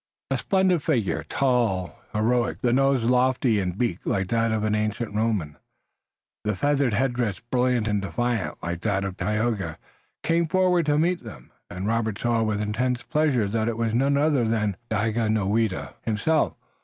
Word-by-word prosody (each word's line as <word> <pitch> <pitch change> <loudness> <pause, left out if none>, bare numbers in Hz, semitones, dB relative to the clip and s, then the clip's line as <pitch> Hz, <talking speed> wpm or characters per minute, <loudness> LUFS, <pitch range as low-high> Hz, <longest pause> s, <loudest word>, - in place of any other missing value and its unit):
A - - +2
splendid 190 -4 +2
figure, 125 - 0
tall, 120 -10 +1 0.2
heroic, 120 +2 0
the 120 -2 +2
nose 135 -1 +3
lofty 125 -2 +2
and 90 -1 -2
beaked 110 -6 -2
like 95 -2 0
that 115 -1 +1
of 110 -1 0
an 110 0 +1
ancient 105 +1 -1
Roman, 105 -9 -1 0.9
the 105 -1 -1
feather 140 +4 +2
headdress 120 -3 0
brilliant 125 -1 0
and 105 -2 0
defiant 120 +3 -2
like 85 0 -3
that 100 -2 0
of 95 -1 -4
Tayoga, 105 +2 -1 0.5
came 165 0 +2
forward 180 -1 +2
to 145 0 +3
meet 175 +3 +1
them, 65 -4 -11 0.2
and 90 +2 -5
Robert 110 -1 0
saw 120 0 +1
with 110 -1 0
intense 120 +4 -1
pleasure 150 -9 +1
that 110 +2 -1
it 115 - -3
was 115 -1 0
none 135 +4 +2
other 145 -5 +2
than 105 -3 0
Daganoweda 110 -1 0
himself. 115 +9 +1
115 Hz, 160 wpm, -25 LUFS, 105-130 Hz, 0.9 s, nose